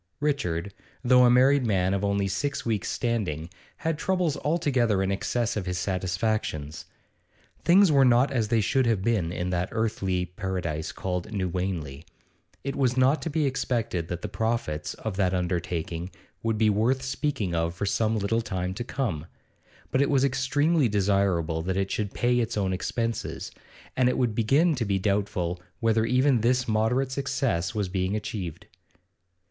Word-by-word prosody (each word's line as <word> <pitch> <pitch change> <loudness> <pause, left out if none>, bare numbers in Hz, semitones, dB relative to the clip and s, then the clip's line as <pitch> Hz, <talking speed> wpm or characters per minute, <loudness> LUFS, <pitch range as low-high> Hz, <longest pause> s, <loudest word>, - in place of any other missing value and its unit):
Richard, 100 - -1 0.3
though 125 0 +6
a - - +6
married 130 +3 +5
man 95 -4 +1
of 100 0 -1
only 100 -1 +1
six 140 +9 -2
weeks' 110 -5 -1
standing, 90 -9 -2 0.3
had 160 -1 -2
troubles 180 -5 +1
altogether 130 - +1
in 95 - 0
excess 115 +4 -1
of 100 -4 -3
his 90 -1 -2
satisfactions. 90 -5 -2 0.8
Things 185 0 +6
were 140 -2 +5
not 125 +2 +4
as 120 -5 0
they 115 +1 +2
should 130 +4 +2
have 110 -5 +1
been 100 -7 +1
in 90 +1 -3
that 90 0 -1
earthly 95 -5 -1
paradise 90 -4 -3
called 90 +2 -4
New 95 -4 -1
Wanley. 85 -6 -3 0.6
It 140 +1 -3
was 130 -2 +1
not 130 +4 +4
to 165 - -3
be 155 0 0
expected 115 -10 -1
that 85 0 -5
the - - -2
profits 110 -10 -2
of 110 -4 -5
that 95 -2 +2
undertaking 85 -1 -2 0.3
would 115 -1 0
be 110 -1 +4
worth 120 +6 +1
speaking 130 - -2
of 85 +1 -1
for 100 - -2
some 110 +2 +1
little 110 +3 0
time 90 -4 -3
to 120 - -4
come, 115 - -3 0.6
but 130 - +2
it 140 - +2
was 135 -2 +3
extremely 140 +2 +2
desirable 95 -5 +1
that 95 +3 -2
it 95 0 -1
should 105 -2 -2
pay 120 0 +1
its 115 -1 -1
own 95 -2 0
expenses, 115 +4 -3 0.4
and 125 -1 +3
it 125 -3 +1
began 140 +10 +3
to 130 -5 -1
be 100 -3 0
doubtful 95 -3 -1 0.2
whether 115 -1 +2
even 125 0 +3
this 125 +2 +2
moderate 115 +5 +1
success 130 -11 -1
was 105 -2 0
being 95 +1 -1
achieved. 95 -6 -5
110 Hz, 165 wpm, -26 LUFS, 90-125 Hz, 0.8 s, though